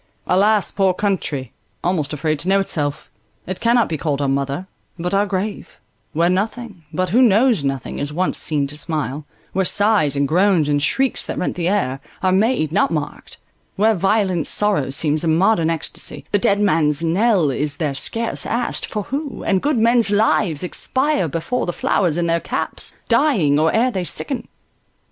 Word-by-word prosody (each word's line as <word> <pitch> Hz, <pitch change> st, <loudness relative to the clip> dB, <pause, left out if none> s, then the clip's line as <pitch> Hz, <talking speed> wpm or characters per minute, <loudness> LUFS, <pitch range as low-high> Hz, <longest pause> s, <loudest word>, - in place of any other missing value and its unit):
Alas, 205 Hz, +2 st, +2 dB
poor 190 Hz, -2 st, +1 dB
country; 155 Hz, -, -2 dB, 0.3 s
Almost 170 Hz, -5 st, -1 dB
afraid 155 Hz, 0 st, -1 dB
to 175 Hz, -, -1 dB
know 195 Hz, +1 st, +4 dB
itself! 150 Hz, -7 st, -2 dB, 0.4 s
It 185 Hz, 0 st, -5 dB
cannot 235 Hz, -1 st, +3 dB
Be 160 Hz, -3 st, -4 dB
called 145 Hz, -3 st, -1 dB
our 140 Hz, -, 0 dB
mother, 140 Hz, +5 st, -2 dB, 0.3 s
but 180 Hz, +2 st, -3 dB
our 200 Hz, +1 st, +2 dB
grave: 200 Hz, +2 st, -4 dB, 0.3 s
where 170 Hz, +2 st, +1 dB
nothing, 205 Hz, 0 st, -2 dB
But 185 Hz, +3 st, -1 dB
who 235 Hz, +8 st, +3 dB
knows 230 Hz, -, +4 dB
nothing, 135 Hz, -3 st, -3 dB
is 145 Hz, +1 st, -2 dB
once 180 Hz, +4 st, 0 dB
seen 150 Hz, -3 st, +1 dB
to 140 Hz, +1 st, -5 dB
smile; 150 Hz, -2 st, -3 dB, 0.3 s
Where 190 Hz, -, +1 dB
sighs, 200 Hz, -7 st, +2 dB
and 140 Hz, 0 st, +1 dB
groans, 180 Hz, -1 st, +3 dB
and 145 Hz, -1 st, +1 dB
shrieks 265 Hz, -, +1 dB
that -, -, -4 dB
rent 180 Hz, -, -2 dB
the 175 Hz, -1 st, -2 dB
air, 180 Hz, -9 st, 0 dB, 0.2 s
Are 185 Hz, -, +3 dB
made, 195 Hz, -, +1 dB
not 195 Hz, -, +2 dB
marked; 150 Hz, -3 st, -5 dB, 0.4 s
where 220 Hz, +3 st, +3 dB
violent 190 Hz, -3 st, +1 dB
sorrow 205 Hz, -11 st, +1 dB
seems 150 Hz, +3 st, 0 dB
A -, -, -1 dB
modern 165 Hz, +1 st, +3 dB
extasy: 165 Hz, -2 st, -3 dB
the 205 Hz, -, +2 dB
dead 200 Hz, +1 st, +2 dB
man's 160 Hz, -6 st, +2 dB
knell 180 Hz, -2 st, +2 dB
Is 145 Hz, +2 st, -1 dB
there 150 Hz, -5 st, -1 dB
scarce 225 Hz, +11 st, -1 dB
asked, 235 Hz, +2 st, -2 dB
for 210 Hz, -2 st, -4 dB
who; 280 Hz, +3 st, -5 dB
and 190 Hz, -2 st, +1 dB
good 295 Hz, -2 st, 0 dB
men's 230 Hz, 0 st, +3 dB
lives 205 Hz, -6 st, +1 dB
Expire 260 Hz, -, 0 dB
before 165 Hz, -, -2 dB
the 175 Hz, -, -2 dB
flowers 175 Hz, -3 st, 0 dB
in 175 Hz, -, 0 dB
their 170 Hz, 0 st, +1 dB
caps, -, -, -3 dB
Dying, 170 Hz, -, +3 dB
or 160 Hz, +1 st, +3 dB
ere 245 Hz, +3 st, +2 dB
they 185 Hz, -5 st, -2 dB
sicken. 245 Hz, -, -2 dB
180 Hz, 180 wpm, -20 LUFS, 150-210 Hz, 0.4 s, know